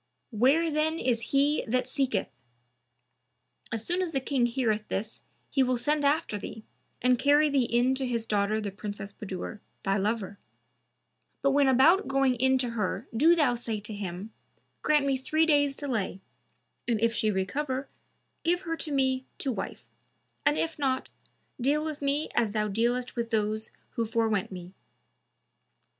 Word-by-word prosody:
Where 275 +9 +3
then 310 +2 +1
is 240 -6 +1
he 285 +2 +2
that 250 +2 +1
seeketh?' 260 -7 0 1.4
As 225 0 -3
soon 355 +2 0
as 350 -3 -2
the 270 - +1
King 260 -2 +1
heareth 230 -4 0
this, 215 +3 -4 0.3
he 270 - +2
will 255 -1 +2
send 295 +4 0
after 285 -7 +1
thee 220 +2 -8 0.4
and 250 -1 +4
carry 290 +2 +4
thee 270 -3 +3
in 240 +3 +2
to 265 0 -1
his 235 -2 -1
daughter 210 0 +1
the 205 -2 -3
Princess 205 0 -6
Budur, 195 +1 -6 0.2
thy 195 0 +1
lover; 205 -1 -2 1.0
but 275 - +4
when 280 0 +4
about 300 +10 +5
going 270 -1 +3
in 260 +2 +3
to 250 -2 +1
her 220 0 -2
do 320 +9 +6
thou 300 -7 +3
say 230 -3 -3
to 210 +1 -7
him, 200 +1 -6 0.5
'Grant 300 -2 +3
me 275 -1 +2
three 310 +5 +2
days' 285 -3 +3
delay, 225 -10 -2 0.7
and 230 -3 +1
if 230 +1 +2
she 220 -2 +1
recover, 260 +8 -2 0.6
give 350 +2 +2
her 330 -3 -3
to 310 - -3
me 265 -1 +1
to 270 - -1
wife; 195 - -5 0.6
and 145 +1 +3
if 160 - -2
not, 260 -2 0 0.5
deal 295 +4 +2
with 305 -2 -5
me 285 +2 0
as 225 -4 +1
thou 210 -1 0
dealest 240 +4 0
with 235 -1 -2
those 215 -1 -1 0.2
who 230 -1 -2
forewent 220 -4 0
me.' 180 0 -8
250 Hz, 165 wpm, -28 LUFS, 215-280 Hz, 1.4 s, do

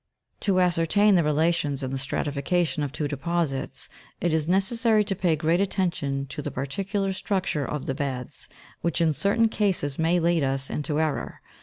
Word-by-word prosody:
To 195 -3 +1
ascertain 180 +4 +3
the 175 -3 +4
relations 150 -2 +1
in 130 - -3
the 135 - -2
stratification 150 +4 -1
of 145 -2 -2
two 150 +1 -2
deposits, 145 -1 -2 0.3
it 170 -2 0
is 160 -1 +1
necessary 215 +4 +3
to 195 -1 -2
pay 175 -3 +2
great 165 +4 +1
attention 170 -8 -1
to 150 - -5
the 145 - -4
particular 195 - -2
structure 185 -5 -1
of 150 -2 -4
the 135 - -1
beds, 130 -3 -5 0.3
which 170 - 0
in 165 -2 +3
certain 205 +8 +2
cases 185 -11 0
may 165 +2 +3
lead 170 -1 +2
us 135 0 -1
into 150 0 -1
error. 155 -2 -2
165 Hz, 170 wpm, -26 LUFS, 145-185 Hz, 0.3 s, the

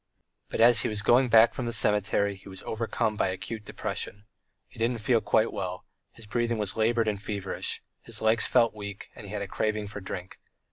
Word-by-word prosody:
But - - -2
as 120 -1 +7
he - - 0
was 105 -1 0
going 125 +4 +4
back 115 0 +6
from 125 - -4
the - - -1
cemetery 100 -2 +2
he 95 +1 -14
was 95 - -5
overcome 110 0 -1
by - - +1
acute 105 +4 -5
depression. 105 +1 -5 0.4
He - - -16
didn't 115 +1 +1
feel 115 +1 +2
quite 110 - +2
well: 90 -2 -4 0.3
his 115 - -13
breathing 120 +2 -1
was 105 -3 0
laboured 115 +1 +2
and 105 -2 -1
feverish, 100 -2 -3 0.2
his - - -4
legs 110 +1 +3
felt 115 -1 +3
weak, 100 -2 -8
and 105 - -11
he - - -9
had 105 -1 -3
a - - -5
craving 105 +1 -1
for 105 0 -7
drink. 95 -1 -7
105 Hz, 205 wpm, -28 LUFS, 100-115 Hz, 0.4 s, as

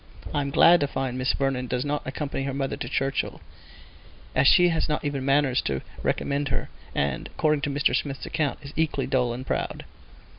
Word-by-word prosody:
I 145 - +1
am 140 - -2
glad 170 +5 +6
to 145 - +1
find 135 -2 -3
Miss 130 0 +1
Vernon 135 -2 -1
does 125 +2 -1
not 145 0 -1
accompany 140 +1 -3
her 135 -1 -3
mother 135 -1 -1
to 120 - -5
Churchhill, 135 0 -1 0.9
as 130 +1 +4
she 175 +2 +7
has 165 -1 0
not 150 0 -1
even 140 -2 -2
manners 135 -1 +3
to 65 -1 -1 0.2
recommend 145 +1 0
her; - - -2 0.3
and, 70 -2 -1
according 150 -2 +1
to 145 - -1
Mr. 140 +1 +2
Smith's 140 -2 -2
account, 155 -4 -1
is 140 - -9
equally 150 -4 0
dull 125 -2 +1
and 125 +2 -5
proud. - - -3
140 Hz, 195 wpm, -26 LUFS, 130-145 Hz, 0.9 s, she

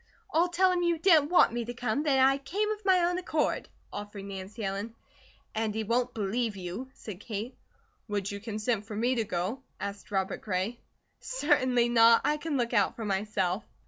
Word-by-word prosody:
"I'll 340 +3 +3
tell 370 +2 +3
him 360 -1 +1
you 345 -1 +2
didn't 320 -4 +5
want 355 -9 +5
me 240 0 -1
to 240 +1 -6
come, 245 +2 -1
that 290 -3 +2
I 270 +1 +5
came 400 +10 -1
of 430 0 -5
my 375 -2 +4
own 355 +1 +1
accord," 320 -4 -1 0.2
offered 205 -1 -7
Nancy 200 +3 -7
Ellen. 200 +4 -4 0.6
"And 220 -1 -1
he 220 - -1
won't 240 +3 0
believe 220 +1 -1
you," 190 +8 -6
said 200 -5 -8
Kate. 215 +3 -5 0.5
"Would 205 -2 -2
you 200 - -5
consent 215 0 -2
for 215 - -6
me 240 +4 +1
to 235 -3 +1
go?" 190 +8 -2 0.2
asked 200 0 -6
Robert 190 -1 -1
Gray. 205 +4 -2 0.4
"Certainly 255 - +2
not! 230 -1 +6
I 300 - +2
can 300 -1 -2
look 240 -1 -1
out 205 -4 +3
for 225 - -5
myself." 195 -1 -1
230 Hz, 190 wpm, -29 LUFS, 205-280 Hz, 0.6 s, not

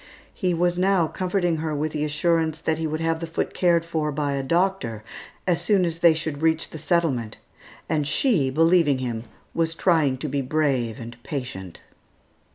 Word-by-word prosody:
He 180 -4 0
was 175 +1 +1
now 190 -2 +3
comforting 180 0 -1
her 155 -1 -2
with 150 +2 -1
the 150 -1 -2
assurance 160 +1 +1
that 160 0 -1
he 160 - -1
would 155 +1 -3
have 165 0 0
the 165 - -4
foot 165 - -3
cared 170 -2 +2
for 160 -2 -1
by 145 0 -1
a 140 - -1
doctor 165 - 0 0.4
as 175 -2 +1
soon 185 +1 +3
as 165 -1 -3
they 170 -2 +6
should 155 -2 -4
reach 160 0 +1
the 160 - -7
settlement; 145 - 0 0.5
and 150 -2 0
she, 155 - +2
believing 165 0 +3
him, 120 -3 -4 0.3
was 165 0 0
trying 160 -7 +2
to 150 - -4
be 140 0 -1
brave 130 -5 0
and 120 +1 -9
patient. 120 - -6
160 Hz, 180 wpm, -24 LUFS, 140-170 Hz, 0.5 s, they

